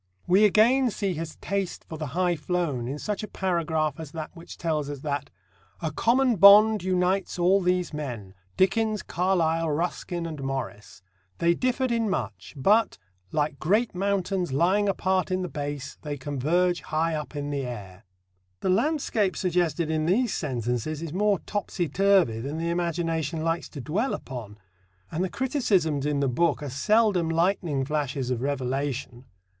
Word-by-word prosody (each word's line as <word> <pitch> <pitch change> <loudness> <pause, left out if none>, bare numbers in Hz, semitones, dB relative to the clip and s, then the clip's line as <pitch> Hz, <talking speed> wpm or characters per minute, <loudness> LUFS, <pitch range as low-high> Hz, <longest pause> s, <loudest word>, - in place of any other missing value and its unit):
We 195 +4 +5
again 240 +6 +4
see 195 -2 -2
his 165 -1 -5
taste 195 -2 -3
for 160 - -7
the 155 -1 -4
high 180 -1 +2
flown 155 -7 -2
in 140 +3 -3
such 210 +6 -3
a 215 - -5
paragraph 160 -6 -1
as 155 -3 -8
that 160 -2 -5
which 170 -1 -11
tells 155 -4 -1
us 145 -2 -6
that 145 -1 -3 0.5
"a 160 -2 -2
common 240 - +2
bond 205 +2 +8
unites 185 +1 0
all 185 +3 +4
these 180 -2 0
men 120 -10 -5 0.2
Dickens, 215 +2 +2
Carlyle, 165 -2 +1
Ruskin 170 +2 -2
and 155 -4 -6
Morris. 130 -9 -5 0.3
They 170 0 +3
differed 255 +4 0
in 230 -2 +1
much; 115 - -4
but, 210 +11 +3 0.3
like 145 -2 -1
great 210 +9 +1
mountains 190 -2 -1
lying 185 +9 +2
apart 190 -1 0
in 185 0 -1
the - - -2
base, 145 -2 -5
they 145 -2 -4
converge 155 +6 0
high 160 +1 -1
up 150 -1 -5
in 145 0 -3
the 140 -1 -1
air." 100 -5 -8 0.6
The - - 0
landscape 225 -4 +1
suggested 170 -3 0
in 155 0 0
these 225 +5 +2
sentences 125 +2 -2
is 165 -2 -5
more 205 +1 +2
topsy 200 -4 -2
turvy 190 - +3
than 140 +6 -4
the 165 +1 -1
imagination 165 -2 -1
likes 165 +1 -1
to 145 - -8
dwell 195 - -1
upon. 110 -5 -8 0.5
And 170 - -1
the 190 - -1
criticisms 190 - 0
in 145 -1 0
the 140 - +2
book 150 +4 +1
are 140 - -5
seldom 200 - +2
lightning 165 -4 +1
flashes 140 -3 -2
of 120 -2 -1
revelation. 135 -2 -3
165 Hz, 160 wpm, -26 LUFS, 145-190 Hz, 0.6 s, bond